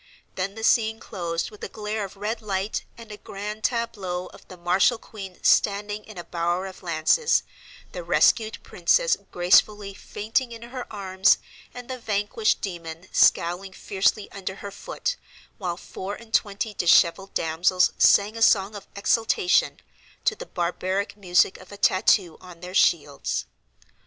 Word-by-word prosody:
Then 195 +2 -3
the 225 - -7
scene 220 -1 +3
closed 170 -5 -4
with 210 - -14
a - - -4
glare 215 0 -4
of 195 0 -8
red 220 +3 -3
light 200 -1 -2
and 230 -2 -11
a 210 - -8
"grand 210 +2 -7
tableau" 205 -7 -2
of - - -16
the 185 - -11
martial 180 +7 +3
queen 195 -4 -10
standing 205 +1 +2
in 215 -3 -12
a 175 - -5
bower 175 +2 -1
of 190 -1 -9
lances, 170 - +2 0.5
the - - -6
rescued 220 - +3
princess - - +2 0.2
gracefully 195 +3 +3
fainting 225 +6 -2
in 230 0 -10
her 250 +1 -8
arms, 190 -2 +3 0.3
and 245 -1 -10
the 255 -1 -5
vanquished 215 0 0
demon 170 -2 -6
scowling 180 +3 +3
fiercely 200 +2 0
under 190 -1 -5
her 200 0 -8
foot, - - -4 0.4
while 175 -3 -3
four 190 +2 -6
and 225 -1 -15
twenty 205 +1 0
dishevelled 175 +1 +3
damsels 170 +3 +2
sang 205 +2 +5
a 225 - -6
song 200 -2 +4
of 205 -2 -9
exultation, 230 - +2 0.4
to 470 - +3
the - - -9
barbaric 185 +3 -2
music 185 -2 +2
of 185 +1 -15
a 205 - -9
tattoo 185 -3 +3
on 180 -2 -13
their 180 0 -8
shields. 145 -7 +1
200 Hz, 155 wpm, -25 LUFS, 180-220 Hz, 0.5 s, sang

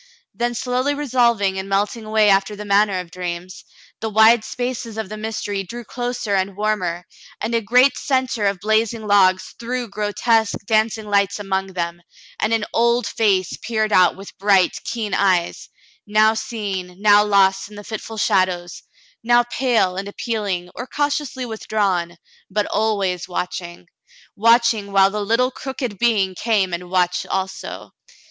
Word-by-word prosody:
Then 240 +4 -2
slowly 255 +4 -1
resolving 235 -8 +1
and 190 +1 -6
melting 205 +3 -1
away 215 0 +3
after 195 +1 +3
the 210 +1 -8
manner 200 -1 +2
of 180 -2 -8
dreams, 180 0 -6 0.4
the 220 - -3
wide 220 +1 +5
spaces 245 -2 -4
of 220 -4 -4
the 215 - -6
mystery 215 -2 -3
drew 235 +6 -8
closer 245 -2 -3
and 190 0 -1
warmer, 185 -5 -1 0.3
and 235 - -3
a 230 - +2
great 250 +5 +4
centre 260 -6 0
of 200 -2 -1
blazing 220 +2 0
logs 190 -2 +3
threw 245 +1 -3
grotesque, 215 +2 0
dancing 220 0 +1
lights 200 -1 +1
among 195 -2 -3
them, 170 -1 -3 0.4
and 215 - 0
an 225 -2 +1
old,';^ 235 +1 +2
face 195 -5 +1
peered 220 -2 -1
out 180 -1 +5
with 195 +1 -11
bright, 195 -2 +3
keen 220 -4 -4
eyes, 185 -3 +1 0.4
now 215 +1 +4
seen, 200 -6 -5
now 205 0 +6
lost 195 -1 +2
in 210 - -13
the 205 - -9
fitful 220 +1 -7
shadows, 185 -3 0 0.4
now 240 +1 +4
pale 230 -8 +1
and 195 +1 -4
appealing 200 -5 -3
or 245 - -7
cautiously 290 -3 -2
withdrawn, 195 -6 -1 0.3
but 205 +2 0
always 200 -5 -1
watching 180 -1 -5 0.3
— - - -26
watching 230 -2 +3
while 195 0 +4
the 210 +1 -3
little 235 +5 +1
crooked 255 -7 -5
being 210 -6 +2
came 200 -2 0
and 175 +1 -5
watched 180 -1 0
also. 190 0 -4
210 Hz, 155 wpm, -20 LUFS, 190-230 Hz, 0.4 s, now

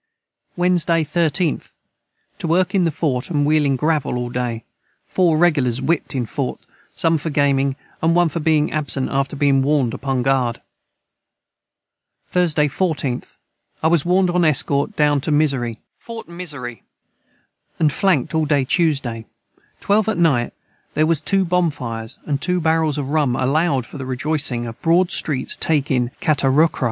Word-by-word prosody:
Wednesday 175 -2 +2
13th. 165 +1 -1 0.7
To - - -3
work 180 +3 +1
in 190 -3 +3
the 165 - +1
Fort 140 -4 -2
a - - -5
wheeling 145 -1 +2
gravel 150 -2 0
all 120 0 -4
day 120 -2 -3 0.4
4 170 -4 +2
regulars 145 -8 +2
whipt 160 -2 -1
in 125 -2 -1
Fort 135 +3 -4 0.4
som 165 -1 +1
for 160 - -4
gaming 140 -2 +1 0.2
& - - -32
one 170 +2 +3
for 165 +1 -3
being 155 -1 +2
absent 145 -3 -2
after 140 +1 -1
being 140 -1 +3
warned 135 -4 +1
upon 130 -2 -2
guard. 130 -3 +1 1.7
Thursday 160 -4 +2
14th. 145 -5 -2 0.5
I - - +4
was 165 -3 +3
warned 180 +1 +2
on 175 0 +2
Escort 145 -2 +2
down 145 -2 +2
to 150 - -2
Mizzery 135 -6 +1 2.0
and 150 -3 +2
flankt 180 -10 +1
all 160 - +2
the 155 - -1
day 140 -3 +2
Tuesday 135 -8 0 0.5
12 210 +1 +2
at 220 - -1
night 140 -9 +2 0.4
there 155 - +3
was 160 -2 +1
2 195 +2 +1
Bonfires 145 -11 -2
& 140 - +1
2 180 0 +1
Barrels 160 -2 +1
of 140 -2 -3
Rum 145 -5 +1
aloud 135 0 +1
for 145 - -10
the 130 - -5
Rejoicing 130 -2 -1
of 115 -1 -9
Broad 170 +2 +3
Street's 135 -5 0
taking 135 -6 0
Catarocrway. 150 +1 +2
150 Hz, 150 wpm, -20 LUFS, 135-165 Hz, 2.0 s, I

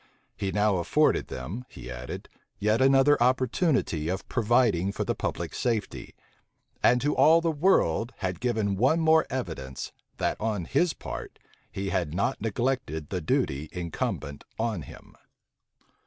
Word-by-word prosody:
He 95 -1 -2
now 105 -1 +2
afforded 85 - +2
them, 80 - -6
he 65 - -9
added, 60 +1 -7 0.3
yet 105 +4 +1
another 135 +1 +5
opportunity 125 - +1
of 95 +1 -3
providing 115 -6 +2
for - - -2
the - - -1
public - - -3
safety; 115 -4 -2 0.7
and 125 +1 +5
to 145 +3 +1
all 155 +5 +6
the 165 -1 0
world 140 - +2
had 90 -2 -3
given 110 -5 0
one 160 - +3 0.2
evidence 80 - -5
more, - - -42
that - - -1
on 105 -5 -1
his 170 - +2
part - - -7 0.3
he 100 0 -3
had 85 -5 -1
not 100 - 0
neglected 115 - -2
the 90 -2 -2
duty 75 -1 0
incumbent 85 -5 -4
on 110 -5 -1
him. - - -13
105 Hz, 140 wpm, -27 LUFS, 85-130 Hz, 0.7 s, all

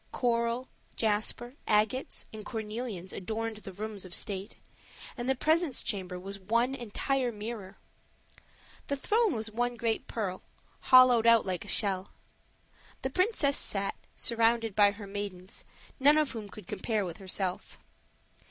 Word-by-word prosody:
Coral, 235 +1 0 0.3
jasper, 220 +3 -1
agates, 215 +5 +1
and 215 -1 -7
cornelians 215 -4 -4
adorned 220 +3 -3
the 205 -2 -8
rooms 210 +1 -4
of 185 -2 -2
state, 195 0 -1 0.6
and 245 0 -3
the 265 - +3
presence 315 0 +2
chamber 185 -4 -3
was 195 +2 -6
one 235 +7 +1
entire 255 +1 -1
mirror. 210 -2 -6 1.1
The 280 - 0
throne 425 - +2
was 220 0 -2
one 245 +2 0
great 230 -1 -1
pearl, 190 -5 -3 0.5
hollowed 255 -3 +8 0.2
like 185 -3 -3
a - - -12
shell; 190 -2 0 0.9
the 265 - -1
princess 365 - +2
sat, 195 -1 0 0.2
surrounded 230 -2 +2
by 205 -1 +7
her 205 0 -7
maidens, 195 -2 -5 0.4
none 290 +3 +6
of 305 -2 +2
whom 220 -4 -6
could 210 -1 -11
compare 215 0 -1
with 175 -2 -6
herself. 185 -1 -3
220 Hz, 135 wpm, -30 LUFS, 200-245 Hz, 1.1 s, hollowed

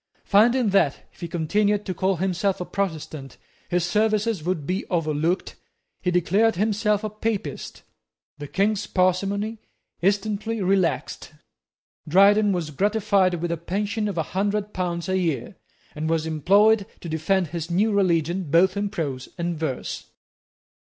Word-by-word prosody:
Finding 230 +3 +4
that, 190 -8 +1
if - - -22
he 170 - -3
continued 205 +5 0
to 185 - -2
call 190 +2 0
himself 190 +2 -1
a 180 - -3
Protestant, 160 -8 -4 0.3
his 175 -1 +1
services 215 0 +1
would 170 -4 -2
be 185 +5 -1
overlooked, 165 +1 -1 0.5
he 180 - 0
declared 190 +6 +2
himself 210 +1 +1
a 215 - -2
Papist. 215 -8 -4 0.6
The 145 - -6
King's 205 +5 0
parsimony 195 +4 0 0.4
instantly 205 +4 0
relaxed. 185 -4 0 0.7
Dryden 200 +5 +5
was 170 -5 -2
gratified 200 +1 +2
with 170 0 -3
a 170 - -1
pension 205 +5 -2
of 200 -4 -4
a 160 - +1
hundred 205 +2 -1
pounds 175 -1 -2
a 190 0 +1
year, 160 -9 -2 0.4
and 155 +1 -3
was 160 -1 0
employed 200 +7 +3
to - - -7
defend 165 +2 0
his 165 0 -5
new 200 +6 +2
religion 175 -3 +1
both 180 +5 +4
in 200 0 -1
prose 140 -9 -4
and 170 0 -2
verse. 150 -5 -4
190 Hz, 145 wpm, -24 LUFS, 170-205 Hz, 0.7 s, Dryden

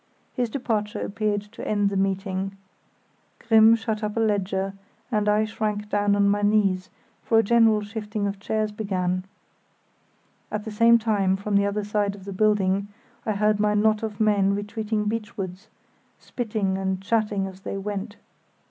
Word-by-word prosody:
His 245 -2 -1
departure 215 -4 -2
appeared 210 -1 -1
to - - -8
end 205 -1 +1
the - - -3
meeting. 195 0 -1 0.8
Grimm 225 -1 +6
shut 220 -1 -3
up 210 +1 -3
a - - +2
ledger, 195 -3 0 0.4
and 210 -2 +1
I 210 +1 +3
shrank 210 -1 -3
down 205 -1 +2
on 200 0 +3
my 205 +1 +2
knees, 205 -3 +2 0.3
for 225 - +2
a 225 - +5
general 225 -1 +4
shifting 210 0 -4
of 200 0 -3
chairs 215 +1 -1
began. 185 -3 -2 1.2
At 210 0 -3
the 220 - -5
same 230 +2 +5
time, 205 -4 +1
from 205 +1 -4
the 200 0 +4
other 205 +1 -2
side 205 -1 -1
of 195 -2 -13
the 200 - -6
building, 200 -1 +2 0.4
I 215 - +2
heard 210 +1 +2
my 210 0 +2
knot 215 0 +3
of 215 -2 -5
men 200 -2 +3
retreating 210 +1 -2
beachwards, 210 -3 -4 0.5
spitting 210 -5 -2
and 190 -1 -1
chatting 210 -1 0
as 190 -1 -8
they 195 - -5
went. 205 +1 -4
210 Hz, 165 wpm, -25 LUFS, 195-215 Hz, 1.2 s, Grimm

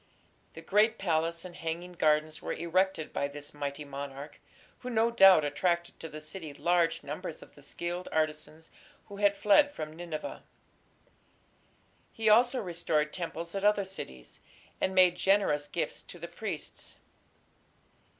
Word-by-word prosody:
The 165 - -9
great 215 +5 +3
palace 165 -1 0
and 175 -1 -9
hanging 170 +2 -5
gardens 155 -2 +1
were - - -3
erected 170 0 0
by 140 - 0
this 145 0 -8
mighty 145 0 -4
monarch, 140 +1 -8 0.4
who 250 - -6
no 230 0 +2
doubt 195 -8 +7
attracted 170 +4 -1
to 165 - -7
the 155 - -8
city 155 -1 -8
large 170 0 +1
numbers - - -6
of - - -18
the - - -17
skilled 175 +1 -5
artisans 155 0 -2 0.4
who 200 - -8
had 200 0 +3
fled 285 +10 +5
from 155 - -6
Nineveh. 165 -2 -6 1.7
He 220 -1 +1
also 245 +4 +5
restored 165 -4 -1
temples 170 -1 -5
at 195 0 -3
other 205 -1 +3
cities, 65 - -9 0.4
and 190 - 0
made 180 -1 +6
generous 190 -8 +2
gifts 170 - -3
to - - -11
the 170 0 -7
priests. 185 -5 -6
170 Hz, 145 wpm, -30 LUFS, 155-195 Hz, 1.7 s, doubt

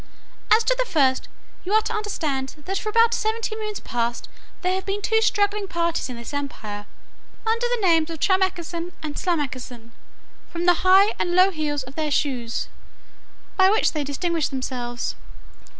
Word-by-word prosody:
As 445 +1 +6
to - - +2
the - - +2
first, 270 -6 +2 0.4
you 380 - -2
are 435 - +6
to 460 - -3
understand, 310 -11 -2
that 385 +1 -1
for 430 - -3
about 460 +1 +4
seventy 440 0 -1
moons 425 -1 -4
past 235 0 -2 0.4
there 365 +1 +2
have 380 0 -2
been 395 +1 -1
two 445 +2 +2
struggling 410 -1 +1
parties 335 -5 -1
in 250 - -5
this 235 +4 -8
empire, 215 -8 -5 0.6
under 460 +2 +1
the 480 -5 0
names 325 -2 +4
of 325 -2 -6
Tramecksan 360 -2 0
and 300 -2 -4
Slamecksan, 260 -8 -3 0.6
from 340 0 -3
the 355 -1 +4
high 380 +3 +6
and 350 0 0
low 370 +2 +6
heels 295 -4 -2
of 260 +1 -11
their 310 0 -1
shoes, 255 -5 -1 0.9
by 380 -1 +6
which 430 +2 +3
they 300 -2 -1
distinguish 320 +3 -1
themselves. 250 -3 -3
340 Hz, 165 wpm, -24 LUFS, 275-410 Hz, 0.9 s, As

